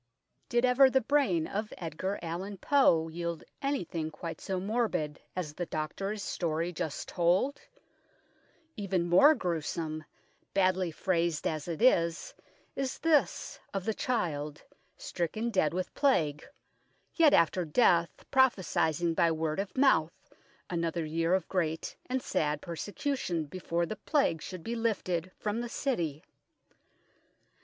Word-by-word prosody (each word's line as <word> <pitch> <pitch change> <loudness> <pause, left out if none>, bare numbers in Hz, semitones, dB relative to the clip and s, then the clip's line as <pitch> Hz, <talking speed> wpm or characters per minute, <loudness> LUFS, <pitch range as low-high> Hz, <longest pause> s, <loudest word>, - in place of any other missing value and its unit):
Did 240 +1 +3
ever 260 +2 +6
the 265 - +3
brain 230 - +2
of 210 +4 -3
Edgar 180 +4 -3
Allan 185 +5 -4
Poe 175 - +4
yield 170 0 -4 0.2
anything 175 - -2
quite 165 +2 -7
so 190 -1 -2
morbid 195 -8 -1
as 170 -5 -3
the 175 +2 -4
doctor's 195 +7 -3
story 170 -1 -2
just 155 -2 -4
told? 185 +10 +1 1.1
Even 190 -4 -1
more 275 - +7
gruesome, 160 - -3 0.5
badly 185 -2 +2
phrased 170 -1 0
as 155 -1 -2
it 170 +5 -3
is, 170 -9 +3 0.4
is 270 -2 -2
this 295 - +1 0.2
of 190 -1 -2
the 220 - +1
child, 150 - -2 0.3
stricken 215 +7 -2
dead 170 -8 +2
with 185 +1 -3
Plague, 155 - +2 0.7
yet 320 -3 +5
after 170 +2 +3
death 170 0 +2
prophesying 175 - +2
by 165 0 +3
word 160 +1 -1
of 195 +2 -4
mouth 190 - +2 0.4
another 170 -2 -1
year 165 +3 +1
of 190 - -2
great 160 -4 -2
and 255 0 -1
sad 150 -1 0
per 170 +2 -6
secution 205 - -2
before 170 +1 -2
the 215 +5 -5
Plague 215 - +1
should 185 -3 -7
be 235 - -3
lifted 185 -6 -1
from 215 +2 -2
the 240 - -4
city. 170 - -2
175 Hz, 130 wpm, -30 LUFS, 165-220 Hz, 1.1 s, more